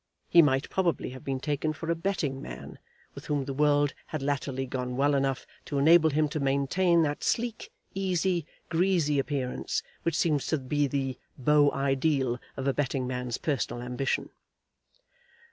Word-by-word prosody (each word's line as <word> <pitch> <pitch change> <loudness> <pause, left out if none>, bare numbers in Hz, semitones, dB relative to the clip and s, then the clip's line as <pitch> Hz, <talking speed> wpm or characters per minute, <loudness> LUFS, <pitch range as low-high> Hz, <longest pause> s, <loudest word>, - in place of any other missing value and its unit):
He 170 - +8
might 135 -3 +2
probably 170 -9 0
have 130 0 -10
been 135 -1 -2
taken 150 +2 -1
for 165 +2 -3
a - - +1
betting 165 -7 -2
man, - - -9 0.3
with - - -10
whom 145 -2 0
the 135 - -4
world 145 0 +3
had 155 -3 -4
latterly 135 -2 -1
gone 125 -1 -4
well 145 +2 +3
enough 135 -1 0 0.2
to 145 - -3
enable 160 +3 +6
him 155 +1 +2
to 155 - -3
maintain 145 +6 +2
that 145 -1 -2
sleek, 235 -1 -1 0.2
easy, 185 -3 0 0.2
greasy 165 -4 +2
appearance 135 -2 -2 0.2
which 165 -2 0
seems 150 -5 +1
to 160 - +1
be 145 +2 0
the 135 -1 -2 0.2
beau 145 +2 +4
ideal 135 -2 +1 0.2
of 135 - -3
a 135 - +3
betting 135 -2 -1
man's 125 -1 -3
personal 130 -5 -2
ambition. 125 +2 -2
145 Hz, 160 wpm, -28 LUFS, 135-160 Hz, 0.3 s, He